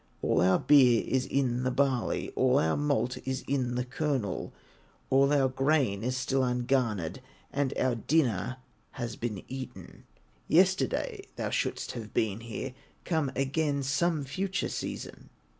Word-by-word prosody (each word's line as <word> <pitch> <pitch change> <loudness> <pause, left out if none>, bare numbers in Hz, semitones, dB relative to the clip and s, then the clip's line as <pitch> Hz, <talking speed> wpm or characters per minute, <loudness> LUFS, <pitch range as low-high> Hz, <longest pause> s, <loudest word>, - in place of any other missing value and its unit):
All 80 - +2
our 95 +1 +5
beer 130 -5 +5
is 130 0 0
in 125 -3 0
the 130 - +1
barley, 130 -2 0
All - - +2
the 80 0 +2
malt 140 -3 0
is 130 0 -3
in 130 -3 0
the 125 0 -1
kernel, 130 - -2 0.6
All 135 +1 +5
our 140 -2 +4
grain 130 -6 +1
is 125 +1 -1
still 130 +1 0
ungarnered, 125 -8 0 0.3
And 140 -2 0
our 130 -1 +2
dinner 125 - +1 0.4
has 120 -3 -4
been 110 -5 -4
eaten; 130 0 -8 0.4
Yesterday 195 - +2
thou - - -3
shouldst - - -1
have 110 -4 -8
been 110 -2 +1
here, 115 +3 -6 0.3
Come 160 -6 0
again 140 +1 0
some 155 +2 +1
future 185 +8 -2
season." - - -6
130 Hz, 140 wpm, -29 LUFS, 120-140 Hz, 0.6 s, our